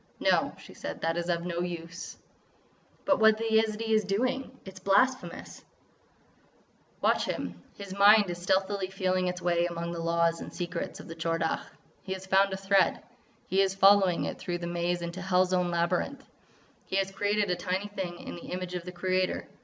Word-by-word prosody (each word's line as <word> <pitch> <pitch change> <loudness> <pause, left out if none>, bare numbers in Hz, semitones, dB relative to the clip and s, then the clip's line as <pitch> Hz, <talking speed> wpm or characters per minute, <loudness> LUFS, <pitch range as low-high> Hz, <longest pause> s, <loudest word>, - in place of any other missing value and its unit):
"No," - - +2
she - - -13
said, - - -7
"that 165 0 0
is 175 0 -2
of 170 0 0
no 170 -1 -3
use." 175 0 -5 0.9
"But 285 -1 +3
what 220 0 +6
that 225 0 -2
Yezidee 220 0 +2
is 215 0 +4
doing 255 +6 -2
is—is 190 -1 -10
blasphemous——" 195 0 0 1.4
"Watch - - +2
him! 90 -1 -4 0.2
His 200 -2 -7
mind 205 +1 +6
is 175 0 -6
stealthily 190 +1 0
feeling 185 -1 0
its 180 0 -4
way 175 0 +2
among 170 0 -4
the 170 - -5
laws 170 0 +1
and - - -7
secrets 175 -1 -4
of - - -10
the 165 - -7
Tchor 165 0 -1
Dagh. 160 - -1 0.3
He 190 - -4
has 190 0 -7
found 195 +1 +3
a 190 - -2
thread. 195 0 +2 0.4
He 190 +1 +2
is 195 0 +1
following 195 -2 +5
it - - -5
through 175 -1 -3
the 175 - -6
maze 175 0 -1
into 170 +2 -5
hell's 185 0 +2
own 180 -1 +2
labyrinth! 175 +11 -1 0.6
He - - -3
has 195 0 +1
created 205 0 0
a - - +2
tiny 185 +3 -2
thing 185 -4 -5
in - - -8
the 170 - -9
image 180 0 -4
of 180 -1 -4
the 180 - -6
Creator. 185 0 -1
185 Hz, 190 wpm, -29 LUFS, 175-200 Hz, 1.4 s, what